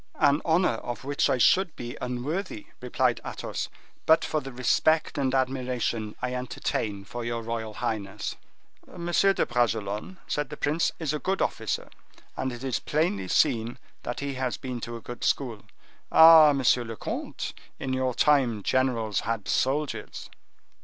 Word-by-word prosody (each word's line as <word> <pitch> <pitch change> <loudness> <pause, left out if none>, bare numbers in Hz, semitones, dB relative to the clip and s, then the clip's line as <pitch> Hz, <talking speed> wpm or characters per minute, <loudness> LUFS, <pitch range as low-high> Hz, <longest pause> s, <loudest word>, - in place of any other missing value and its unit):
"An 145 0 +3
honor 165 -7 +2
of 120 -3 -6
which 140 +1 +1
I - - +2
should 185 +7 +4
be 120 0 -6
unworthy," 155 - -3 0.2
replied - - +1
Athos, - - -4 0.4
"but 160 0 +5
for 155 - -1
the 135 - -7
respect 155 +5 +2
and 135 -2 +1
admiration 125 -4 -1
I 125 0 -1
entertain 110 -5 -3
for 120 +3 -6
your 115 0 -3
royal 110 -2 -4
highness." 105 -4 -3 0.5
"Monsieur 175 +3 +2
de - - +1
Bragelonne," 115 - -1
said 150 -3 -1
the 150 - -7
prince, 155 +3 +1
"is 155 -3 -2
a 150 - -1
good 190 +4 -1
officer, - - -1 0.5
and 130 0 -2
it 120 +1 -8
is 130 -3 -1
plainly 145 - 0
seen 115 +5 +2 0.2
that 120 - -4
he 140 0 -2
has 130 -1 -2
been 125 -2 -5
to 120 +1 -5
a 115 - -8
good 120 +1 -8
school. 120 -7 0 0.5
Ah, 160 -2 +9
monsieur 130 -3 +3
le 115 -1 -6
comte, - - -5 0.2
in 130 - -3
your 130 -1 0
time, 130 -8 +3
generals 120 -5 +1
had 115 -2 -3
soldiers!" 140 +3 -1
125 Hz, 160 wpm, -27 LUFS, 115-150 Hz, 0.5 s, Ah